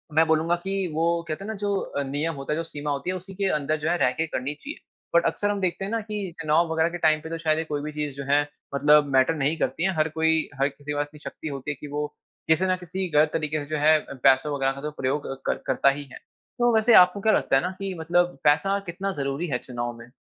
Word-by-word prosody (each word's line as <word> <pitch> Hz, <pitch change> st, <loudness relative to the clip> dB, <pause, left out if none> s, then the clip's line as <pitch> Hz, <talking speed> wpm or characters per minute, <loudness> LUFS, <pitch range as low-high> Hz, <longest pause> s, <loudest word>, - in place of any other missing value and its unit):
मैं 160 Hz, +1 st, +5 dB
बोलूंगा 160 Hz, +2 st, +2 dB
कि 195 Hz, 0 st, -1 dB, 0.2 s
वो 160 Hz, +2 st, +1 dB, 0.2 s
कहते 155 Hz, +4 st, -4 dB
है 200 Hz, -, -7 dB
ना, 220 Hz, -, -3 dB
जो 200 Hz, -1 st, -2 dB, 0.2 s
नियम 155 Hz, +3 st, -1 dB
होता 135 Hz, +2 st, -3 dB
है, 155 Hz, -, -1 dB
जो 165 Hz, -, -1 dB
सीमा 150 Hz, -2 st, -5 dB
होती 145 Hz, +5 st, -3 dB
है 185 Hz, -, -1 dB
उसी 185 Hz, +2 st, -8 dB
के 195 Hz, -1 st, 0 dB
अंदर 155 Hz, +2 st, -1 dB
जो 155 Hz, +2 st, -1 dB
है 175 Hz, -, +2 dB
रह 125 Hz, -, +3 dB
के 160 Hz, +4 st, -2 dB
करनी 140 Hz, -1 st, -3 dB
चाहिए। 290 Hz, -, -8 dB, 0.4 s
बट 170 Hz, -, +5 dB
अक्सर 205 Hz, -, 0 dB
हम 205 Hz, -1 st, -1 dB
देखते 185 Hz, +1 st, -1 dB
है 200 Hz, -, -5 dB
ना, 230 Hz, -, 0 dB
कि 205 Hz, -3 st, -4 dB
चुनाव 160 Hz, +1 st, +2 dB
वगैरह 160 Hz, +1 st, +2 dB
के 175 Hz, -, -5 dB
टाइम 155 Hz, -2 st, +3 dB
पे 160 Hz, -, -8 dB
तो 165 Hz, -, -3 dB
शायद 155 Hz, -1 st, +1 dB
ये 160 Hz, -, 0 dB
कोई 145 Hz, -2 st, -3 dB
भी 150 Hz, -, -5 dB
चीज़ 150 Hz, -2 st, -4 dB
जो 140 Hz, -, -5 dB
है 145 Hz, -, +5 dB, 0.3 s
मतलब 150 Hz, +1 st, +5 dB
मैटर 130 Hz, +5 st, +4 dB
नहीं 150 Hz, +2 st, 0 dB
करती 135 Hz, +6 st, -1 dB
है। 190 Hz, -, +2 dB
हर 155 Hz, +1 st, +1 dB
कोई 160 Hz, 0 st, +1 dB
हर 135 Hz, -, +3 dB
किसी 145 Hz, +1 st, -8 dB
के 145 Hz, -, -2 dB
पास 145 Hz, -, +1 dB
इतनी 150 Hz, 0 st, -16 dB
शक्ति 155 Hz, -, -8 dB
होती 140 Hz, +1 st, -4 dB
है -, -, -4 dB
की 150 Hz, -, -8 dB
वो 150 Hz, +1 st, -1 dB, 0.4 s
किसी 160 Hz, +4 st, +3 dB
न 185 Hz, 0 st, +2 dB
किसी 185 Hz, +1 st, -4 dB
गलत 150 Hz, +1 st, +5 dB
तरीके 155 Hz, -1 st, -1 dB
से -, -, -8 dB
जो 155 Hz, -, -1 dB
है 155 Hz, 0 st, +6 dB, 0.3 s
पैसों 135 Hz, +2 st, +4 dB
वगैरह 135 Hz, -1 st, +1 dB
का 140 Hz, 0 st, -8 dB
तो 150 Hz, -, -4 dB
प्रयोग 135 Hz, +3 st, -1 dB, 0.2 s
कर -, -, +1 dB
करता 140 Hz, -, +4 dB
ही 140 Hz, +1 st, -2 dB
है। -, -, -8 dB, 0.4 s
तो 240 Hz, -1 st, +4 dB
वैसे 220 Hz, +2 st, +4 dB
आपको 180 Hz, +1 st, +7 dB
क्या 220 Hz, -, +3 dB
लगता -, -, +2 dB
है 135 Hz, -, +4 dB
ना, 180 Hz, -, -2 dB
कि 195 Hz, -1 st, -3 dB
मतलब 175 Hz, -1 st, +1 dB
पैसा 195 Hz, +7 st, +3 dB
कितना 195 Hz, +3 st, -3 dB
जरूरी 140 Hz, +5 st, -2 dB
है 130 Hz, -4 st, 0 dB
चुनाव 120 Hz, -1 st, -5 dB
में? 115 Hz, 0 st, -12 dB
155 Hz, 275 wpm, -25 LUFS, 145-180 Hz, 0.4 s, आपको